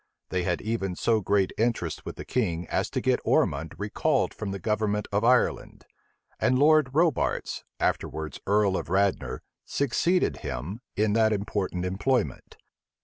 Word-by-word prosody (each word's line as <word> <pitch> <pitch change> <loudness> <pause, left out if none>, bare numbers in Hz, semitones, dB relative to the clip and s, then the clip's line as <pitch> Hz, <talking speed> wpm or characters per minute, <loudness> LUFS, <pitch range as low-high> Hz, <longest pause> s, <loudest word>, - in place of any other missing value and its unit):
They 90 - 0
had 90 0 -1
even 105 -4 -2
so 110 +3 +2
great 100 0 +1
interest 115 -8 -1
with - - -5
the - - -8
king 90 -9 -1
as - - 0
to - - -2
get - - +2
Ormond 80 +3 +1
recalled 105 0 0
from 105 - -5
the 100 - -3
government 105 +1 -1
of 100 +2 +1
Ireland; 125 +1 +1 0.5
and 130 - +3
Lord 155 0 +5
Robarts, 165 -3 +1 0.2
afterwards 80 -3 -2
earl 100 -1 +3
of - - -5
Radnor, 95 +1 0 0.2
succeeded 170 +7 +1
him 85 - -5 0.2
in 105 0 +2
that 110 0 +4
important 100 -3 -2
employment. 105 +6 -1
105 Hz, 145 wpm, -27 LUFS, 95-115 Hz, 0.5 s, Lord